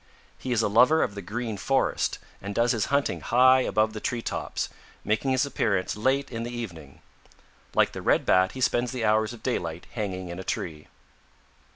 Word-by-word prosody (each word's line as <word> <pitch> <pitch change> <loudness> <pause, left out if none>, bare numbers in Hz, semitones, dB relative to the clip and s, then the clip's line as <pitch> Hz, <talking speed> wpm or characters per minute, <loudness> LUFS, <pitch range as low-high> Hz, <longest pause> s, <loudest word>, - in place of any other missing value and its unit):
He 130 - -4
is 115 -2 +2
a - - +3
lover 125 +10 +5
of - - -2
the 100 - -6
Green 110 +3 -4
Forest 135 +7 0 0.2
and 100 +1 -5
does 115 0 +3
his 115 -4 0
hunting 140 0 0
high 130 +2 +5
above 110 -3 +1
the 110 - -5
tree 120 +2 -3
tops, - - -3 0.4
making 110 +6 0
his 130 +1 +2
appearance 100 -8 0
late 130 +5 0
in 115 -1 -4
the 120 - -4
evening. 85 - -8 0.7
Like - - +4
the - - -7
Red - - +2
Bat 95 0 +3
he 130 - -7
spends 120 -1 +1
the 120 -3 -2
hours 110 +1 +2
of 120 -2 -11
daylight 85 -10 -2
hanging 95 -5 -4
in 85 +1 -6
a - - -5
tree. 80 -4 -4
110 Hz, 195 wpm, -26 LUFS, 100-125 Hz, 0.7 s, lover